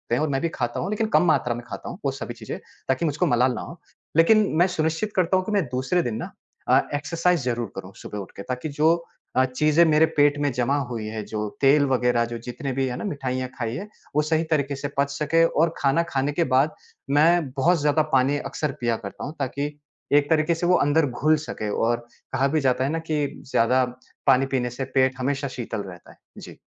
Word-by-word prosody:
हैं 125 - 0
और 155 - +1
मैं 135 -1 0
भी 170 - 0
खाता 120 -5 -3
हूँ, 185 - -2
लेकिन 215 +1 0
कम - - +5
मात्रा 140 -7 +2
में 120 - -7
खाता - - -7
हूँ 180 - -8
वो 135 - +2
सभी 135 -3 -6
चीज़ें 115 -2 -7 0.3
ताकि 130 +5 +1
मुझको 150 -2 0
मलाल 125 +1 +3
ना - - -5
हो 170 - -9 0.4
लेकिन 190 +7 +6 0.2
मैं 175 +2 +5
सुनिश्चित 160 +4 -1
करता 185 0 +3
हूँ, 185 - -1
कि 215 - -3
मैं 200 -3 +2
दूसरे 135 +8 +1
दिन 120 -3 -2
ना - - -6 0.4
अ, - - +6
एक्सरसाइज़ 165 +3 +1
ज़रूर 120 -3 -2
करूँ 95 0 -8
सुबह 105 - -8
उठ 95 - -8
के, - - -5
ताकि 130 +6 -4
जो 155 +3 +3 0.4
अ, 130 - +5
चीज़ें 150 +5 +3
मेरे 155 0 +5
पेट 145 0 +4
में 145 -1 +1
जमा 125 +3 +1
हुई 115 -3 -4
हैं, 110 0 -4
जो 105 -1 -3
तेल 140 +1 +5
वग़ैरह 125 -2 +2
जो 120 0 -5
जितने 135 +3 -4
भी 135 0 0
है 125 - -3
ना, - - -5
मिठाइयाँ 130 -7 -3
खाई 115 -1 -2
हैं 205 +7 -6 0.3
वो 150 - +4
सही 160 +1 +1
तरीके 140 -2 +1
से 145 +1 -4
पच 140 0 +2
सकें 165 +3 +3
और 165 0 +1
खाना 140 +4 +2
खाने 140 0 0
के 170 - +2
बाद 140 +4 +3 0.4
मैं 160 0 +4
बहुत 170 +5 +3
ज़्यादा 150 +1 +3
पानी 135 +2 +3
अक्सर 150 0 -3
पिया 120 -1 +1
करता 100 - -7
हूँ 150 - -7
ताकि 140 +2 -2 0.5
एक 145 0 +2
तरीके 160 +1 +3
से 165 - -2
वो 180 - +5
अंदर 150 +2 +3
घुल 150 +5 +2
सके 105 - -4 0.2
और 120 0 0 0.3
कहा 135 +1 +2
भी 155 - +3
जाता 130 -1 +2
है - - 0
ना 165 - -1
कि 150 -1 +1 0.3
ज़्यादा 125 +3 +3 0.4
पानी 130 +2 +5
पीने 125 -1 0
से 125 +2 -5
पेट 130 -1 +3
हमेशा 140 +2 -1
शीतल 115 -4 -5
रहता 90 -3 -11
है। - - -20 0.2
जी। - - -11
140 Hz, 230 wpm, -24 LUFS, 125-160 Hz, 0.5 s, लेकिन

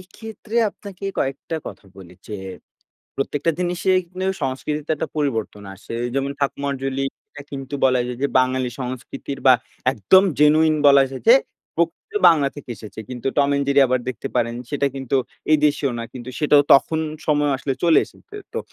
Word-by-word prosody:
এক্ষেত্রে 215 +4 -8
আপনাকে 200 -1 -11
কয়েকটা 135 +4 -2
কথা - - -9
বলি 90 -2 -13
যে, 105 - -5 0.8
প্রত্যেকটা 145 +3 0
জিনিসে 180 +1 0 0.2
কিন্তু 185 +2 -5 0.2
সংস্কৃতিতে 150 +3 -3
একটা - - -3
পরিবর্তন 115 -8 -2
আসে 105 - -9 0.2
যেমন 135 0 0
ঠাকুমারঝুলি 135 -1 -2 0.3
এটা 145 - -10
কিন্তু 135 0 -6
বলা 130 -1 +4
যায় 125 0 -5
যে, - - +4
বাঙালি 130 0 +1
সংস্কৃতির 130 +2 -6
বা 130 - +9 0.4
একদম 135 - +5 0.2
জেনুইন 155 +1 +5
বলা 140 -1 +7
যায় 130 - -7
যে, 240 - +10 0.4
প্রকৃত 170 - -2 0.2
বাংলা 145 -5 +3
থেকে 135 -3 -10
এসেছে 105 +1 -10
কিন্তু 125 0 -6
'টম 140 -1 +4
অ্যান্ড 140 0 +1
জেরি' 140 0 +5
আবার 130 0 +1
দেখতে 130 +2 -4
পারেন 115 -1 +1 0.2
সেটা 140 -1 0
কিন্তু 135 0 -1 0.3
এই 155 - +6
দেশেও 145 -3 0
না 115 - -4
কিন্তু 125 -1 -9
সেটাও 145 -1 +5
তখন 160 +3 +3 0.3
সময় 145 -1 +2
আসলে 135 0 -3
চলে 170 -2 +5
এসেছে। 420 - -19 0.2
তো - - -2
140 Hz, 165 wpm, -21 LUFS, 130-155 Hz, 0.8 s, যে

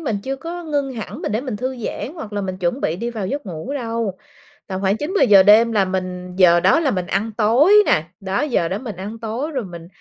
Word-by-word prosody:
mình 230 -10 -2
chưa 270 +1 -3
có 340 +4 -7
ngưng 285 -3 -1
hẳn, 220 -4 -7
mình 200 - -2
để 220 - 0
mình 255 -6 -4
thư 255 +3 -3
giãn, 235 - -5
hoặc 220 -10 -8
là 205 - -2
mình 185 -1 -4
chuẩn 185 +9 -1
bị 165 - -1
đi 235 +4 -3
vào 215 -5 -4
giấc 280 +2 -4
ngủ 180 - -6
đâu. 230 -7 -3 0.5
Tầm 190 0 -4
khoảng 200 +2 +1
9:00-10:00 290 - +4
đêm 220 +4 +6
là 205 -3 +2
mình 180 -1 -4
giờ 175 -2 +6
đó 325 - +4
là 290 -5 +1
mình 185 -4 -2
ăn 210 +4 -1
tối 240 - +4
nà, 155 +1 +2
đó, 195 +3 -2
giờ 250 - 0
đó 190 - -2
mình 225 -3 -7
ăn 205 +5 -7
tối. 235 +7 -4
Rồi 260 -7 -3
mình 170 -2 -10
220 Hz, 245 wpm, -20 LUFS, 190-260 Hz, 0.5 s, đêm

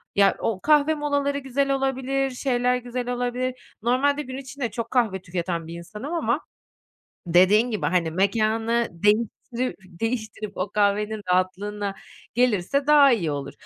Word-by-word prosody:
Ya, 200 -1 +5
o 200 -4 -2
kahve 300 0 +4
molaları 285 -1 0
güzel 275 +1 -1
olabilir, 270 0 0
şeyler 250 -1 +1
güzel 245 0 -4
olabilir. 245 +1 -2 0.3
Normalde 280 +5 +2
gün 260 -1 -7
içinde 270 -2 -5
çok 230 -2 -5
kahve 220 -7 +1
tüketen 170 -2 -3
bir 165 - -7
insanım 210 - -7
ama 290 -4 0 0.9
dediğin 185 +7 +5
gibi, 215 - -1
hani, 170 -3 +1
mekânı 225 +5 +1
değiştirü 225 +6 0 0.3
değiştirip 220 -2 -3
o 185 +2 -2
kahvenin 210 +1 +1
rahatlığına 200 +2 -1 0.4
gelirse 250 +3 +1
daha 290 -3 +7
iyi 175 -9 0
olur. 140 -1 -4
235 Hz, 135 wpm, -24 LUFS, 200-265 Hz, 0.9 s, daha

